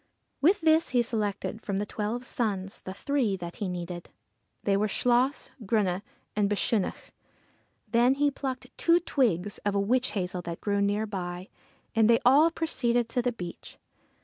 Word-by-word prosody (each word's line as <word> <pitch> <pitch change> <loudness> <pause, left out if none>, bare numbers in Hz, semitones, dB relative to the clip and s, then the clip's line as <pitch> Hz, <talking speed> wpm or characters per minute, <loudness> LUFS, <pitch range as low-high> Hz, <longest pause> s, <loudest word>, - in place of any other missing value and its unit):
With 360 +7 +4
this 320 +1 +4
he 240 - +5
selected 215 -1 -3
from 200 -3 -2
the 205 - -1
twelve 220 +4 -3
sons 200 -6 -2
the 190 - -6
three 250 -8 0
that 175 -1 -7
he 200 - -2
needed. 175 -1 -5 0.5
They 200 - +2
were 210 +2 +2
Chluas, 245 +6 +1
Grunne, 195 -3 +1 0.3
and 205 -1 +2
Bechunach. 205 0 -1 0.8
Then 240 +4 +4
he 290 +1 +2
plucked 260 -2 -5
two 335 +1 +5
twigs 205 - 0
of 205 -1 -1
a - - +3
witch 245 +6 +1
hazel 180 -2 -2
that 170 -1 -6
grew 200 -1 0
near 205 +2 +1
by, 180 -2 -5 0.4
and 225 0 +4
they 230 - +7
all 285 +6 +7
proceeded 245 -8 0
to 245 - 0
the 245 0 0
beach. 180 -7 -8
215 Hz, 165 wpm, -28 LUFS, 195-250 Hz, 0.8 s, they